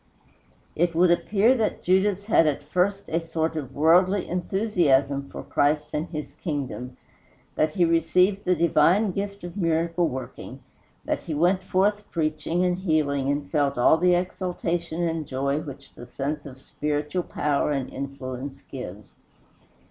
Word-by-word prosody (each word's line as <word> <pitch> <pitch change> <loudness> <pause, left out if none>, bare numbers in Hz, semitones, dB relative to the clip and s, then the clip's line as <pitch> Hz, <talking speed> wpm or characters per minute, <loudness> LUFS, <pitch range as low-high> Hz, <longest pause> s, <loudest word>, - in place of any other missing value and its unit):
It 170 +1 +1
would 175 +1 +5
appear 210 +7 +3
that 225 -4 -1
Judas 195 +2 +2
had 185 -7 +4
at 145 - -1
first 195 +2 0
a 165 +1 -1
sort 160 0 -2
of 135 -4 -5
worldly 180 +6 +4
enthusiasm 170 -8 +1
for - - -8
Christ 150 +1 0
and 155 +3 -2
his 150 -3 -6
kingdom; 135 -5 -5 0.6
that 155 0 0
he 175 - +4
received 180 +4 +2
the 180 - +2
divine 170 +5 +3
gift 200 +1 -5
of 175 0 -7
miracle 165 -1 +1
working; 130 -2 -7 0.4
that - - -1
he 160 - -5
went 180 +5 +2
forth 200 +3 +1
preaching 160 +2 -1
and 180 0 0
healing, 145 -6 0
and 145 0 -3
felt 145 -3 +1
all 125 +6 +5
the 180 +1 +4
exultation 175 -2 -2
and 165 -3 -2
joy 140 +2 -1
which 140 -3 -9
the 120 - -11
sense 145 +3 -4
of 130 -1 -11
spiritual 150 +5 -2
power 150 -3 -1
and 135 -3 -3
influence 135 0 -6
gives. 105 -6 -9
160 Hz, 150 wpm, -25 LUFS, 145-180 Hz, 0.6 s, would